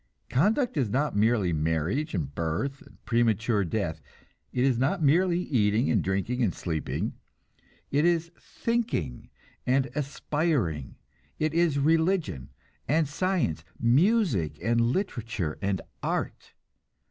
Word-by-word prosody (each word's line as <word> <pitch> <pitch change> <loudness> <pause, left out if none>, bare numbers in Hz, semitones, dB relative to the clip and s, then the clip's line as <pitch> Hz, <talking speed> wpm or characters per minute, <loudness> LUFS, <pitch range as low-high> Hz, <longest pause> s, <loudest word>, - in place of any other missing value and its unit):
Conduct 225 - +2
is 130 -7 +1
not 140 +5 0
merely 105 -4 +2
marriage 80 - 0
and 70 -6 -3
birth 85 - -2
and - - -17
premature 115 -2 +2
death; 85 -4 -2 0.5
it 125 - 0
is 130 -3 +2
not 155 +7 +1
merely 175 +4 +3
eating 110 - +2
and 105 -8 +2
drinking 100 +7 -1
and 105 -7 +1
sleeping: 80 -3 -3 0.8
it 145 +2 +3
is 170 -1 +2
thinking 225 - -2 0.4
and 130 0 +2
aspiring; 140 - -1 0.4
it 155 0 0
is 165 -3 +2
religion 160 - +1 0.4
and 155 +1 +2
science, 145 - -1 0.2
music 135 - +2
and 115 +1 +1
literature 115 - -1
and 100 -1 0 0.2
art. - - -3
125 Hz, 120 wpm, -27 LUFS, 95-160 Hz, 0.8 s, merely